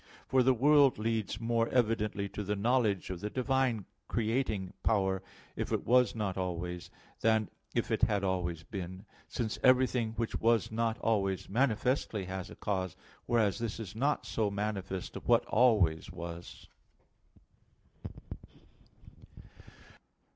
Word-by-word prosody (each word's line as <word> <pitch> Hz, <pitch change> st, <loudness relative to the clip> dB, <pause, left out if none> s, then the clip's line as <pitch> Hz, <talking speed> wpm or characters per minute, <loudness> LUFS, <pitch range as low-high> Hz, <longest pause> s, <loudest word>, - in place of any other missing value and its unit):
For 130 Hz, 0 st, +4 dB
the 130 Hz, +1 st, +4 dB
world 140 Hz, +2 st, +5 dB
leads 110 Hz, -1 st, -1 dB
more 115 Hz, 0 st, +1 dB
evidently 110 Hz, -4 st, +1 dB
to 105 Hz, -, -5 dB
the 105 Hz, +1 st, -1 dB
knowledge 105 Hz, -4 st, +1 dB
of 90 Hz, -, -5 dB
the 105 Hz, -, -3 dB
divine 130 Hz, -4 st, 0 dB, 0.2 s
creating 110 Hz, -4 st, -1 dB
power, 95 Hz, -3 st, +1 dB, 0.3 s
if -, -, -3 dB
it -, -, -1 dB
was 125 Hz, 0 st, +4 dB
not 100 Hz, -4 st, -2 dB
always, 90 Hz, -1 st, -4 dB, 0.3 s
than 110 Hz, -2 st, +2 dB, 0.2 s
if -, -, 0 dB
it -, -, +1 dB
had 105 Hz, -3 st, +2 dB
always 90 Hz, -4 st, -1 dB
been; 95 Hz, +3 st, -7 dB, 0.2 s
since 115 Hz, -4 st, -3 dB
everything 130 Hz, -3 st, +3 dB
which 115 Hz, 0 st, -2 dB
was 115 Hz, -1 st, +2 dB
not 115 Hz, 0 st, 0 dB
always 100 Hz, -4 st, 0 dB
manifestly 115 Hz, -2 st, +1 dB
has 95 Hz, 0 st, -5 dB
a -, -, -10 dB
cause; 95 Hz, -4 st, -2 dB, 0.3 s
whereas 110 Hz, -3 st, +2 dB
this 115 Hz, -1 st, -3 dB
is 105 Hz, -3 st, -7 dB
not 140 Hz, +6 st, 0 dB
so 110 Hz, -2 st, 0 dB
manifest 100 Hz, -2 st, -3 dB
of -, -, -8 dB
what -, -, +4 dB
always 100 Hz, -9 st, +3 dB
was. 85 Hz, 0 st, -8 dB
110 Hz, 135 wpm, -32 LUFS, 95-115 Hz, 0.3 s, world